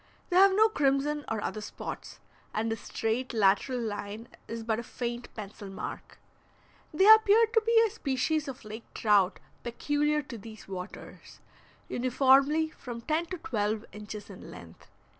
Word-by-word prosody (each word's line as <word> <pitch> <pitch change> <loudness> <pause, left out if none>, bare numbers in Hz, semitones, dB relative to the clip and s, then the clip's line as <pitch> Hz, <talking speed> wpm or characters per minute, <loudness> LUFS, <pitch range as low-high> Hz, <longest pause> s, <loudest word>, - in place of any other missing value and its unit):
They - - +1
have 385 +1 +7
no 435 +2 +6
crimson 290 -4 0
or 220 -1 -2
other 215 - -3
spots, 210 - -7 0.4
and 225 +1 0
the - - 0
straight 225 +3 -3
lateral 215 +5 +3
line 215 0 -5 0.2
is 230 0 -5
but 225 0 0
a - - -5
faint 240 0 -5
pencil 205 -1 -8
mark. 195 - -7 0.7
They 380 +6 +3
appeared 440 +1 +7
to 450 - +5
be 460 +1 +4
a 440 - -2
species 305 - -1
of 260 -4 -8
lake 215 +2 -9
trout 205 -3 +3 0.2
peculiar 290 +5 0
to 235 -5 -8
these 220 0 -11
waters, 185 0 -9 0.5
uniformly 275 +5 +3
from 240 -5 -8
ten 315 +6 -1
to 370 - -5
twelve 215 -6 -2
inches 210 0 -8
in - - -11
length. - - -13
245 Hz, 155 wpm, -29 LUFS, 215-300 Hz, 0.7 s, have